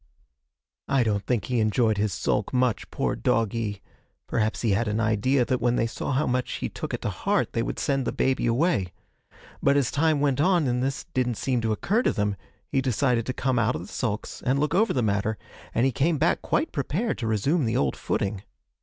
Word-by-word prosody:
'I 135 -3 +3
don't 105 -3 -1
think 120 -5 0
he 125 -2 0
enjoyed 110 0 +2
his 105 -1 +1
sulk - - -1
much, 125 -4 0
poor - - -1
doggie; 110 -3 -1 0.4
perhaps 110 -1 -1
he 115 - +2
had 105 +4 +1
an 105 +1 0
idea 115 +4 +2
that 125 0 -1
when 120 0 +2
they 115 - +2
saw 115 - -4
how 140 +3 +1
much 125 0 -1
he - - -3
took - - -6
it - - -4
to - - 0
heart - - 0
they - - 0
would - - -3
send 135 -2 0
the - - +1
baby 130 -2 +1
away. 115 - +1 0.7
But 140 +1 +4
as 135 -3 +1
time 155 0 +2
went 140 -1 +1
on 175 -1 +3
and 125 0 0
this 135 +1 -2
didn't 125 -2 0
seem 125 -3 0
to 110 -1 0
occur 200 - +1
to - - +1
them, 105 -2 0 0.3
he 135 - 0
decided 125 -2 +1
to 130 - -1
come 130 -1 0
out 120 +2 +1
of - - -4
the 90 - -10
sulks 110 -4 -3
and 130 +2 +2
look 150 +3 0
over 220 +5 +3
the 125 - 0
matter, 105 +1 0 0.3
and 120 - +2
he 135 - +3
came 155 +7 +1
back 160 +4 +2
quite 315 - 0
prepared 165 - -2
to 115 - -2
resume 130 - +1
the 115 +1 0
old 70 -2 +1
footing. 100 -1 -2
125 Hz, 220 wpm, -26 LUFS, 110-140 Hz, 0.7 s, But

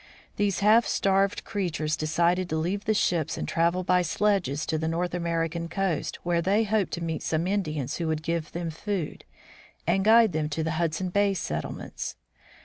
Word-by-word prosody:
These 205 -2 0
half 220 +3 +5
starved 195 0 +1
creatures 165 -7 -1
decided 170 +3 +1
to 160 - -1
leave 180 +6 -1
the 215 - +2
ships 170 -6 +1
and - - -3
travel 170 +2 +1
by 180 0 +3
sledges 175 -4 0
to 160 -1 -1
the 160 - -1
North 170 +2 -1
Ameri 170 -2 -1
can 170 0 -4
coast, 190 -3 -1
where 170 -1 +1
they 200 +5 +2
hoped 205 -5 0
to 170 - -3
meet 160 -2 -2
some 160 +1 -1
Indians 155 -9 -1
who 170 - -2
would 155 -1 -1
give 165 -1 -2
them 170 -1 -3
food 185 0 -4 0.6
and 190 +3 +2
guide 225 0 +6
them 155 -1 -1
to 160 +2 -2
the 160 - -1
Hudson 170 +2 -1
Bay 200 +1 +2
settlements. 80 - -4
170 Hz, 185 wpm, -27 LUFS, 160-195 Hz, 0.6 s, guide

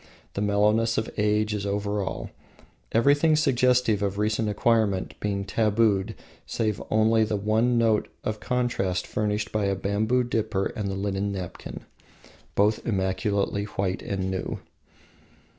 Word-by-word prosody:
The 100 - -3
mellowness 105 +3 +2
of 110 - -1
age 105 0 +1
is 105 -1 -2
over 100 +1 -1
all, 95 - -4 0.6
everything 145 +7 +4
suggestive 125 -6 +3
of 100 -1 -1
recent 110 +1 0
acquirement 105 -3 +1
being 100 -1 -2
tabooed 105 -1 +1 0.3
save 110 -3 -1
only 110 +1 +3
the 110 0 -1
one 110 +4 +2
note 115 -2 +2 0.2
of 110 0 -3
contrast 115 -8 -1
furnished 105 0 -2
by 105 -2 0
the 100 - +1
bamboo 110 +6 +1
dipper 110 -4 -1
and 105 -2 -2
the 95 - -3
linen 100 0 -1
napkin, 95 -3 -6 0.7
both 105 +2 +2
immaculately 100 0 0
white 95 -2 -2
and 95 -1 -2
new. 95 - -3
105 Hz, 135 wpm, -26 LUFS, 100-110 Hz, 0.7 s, everything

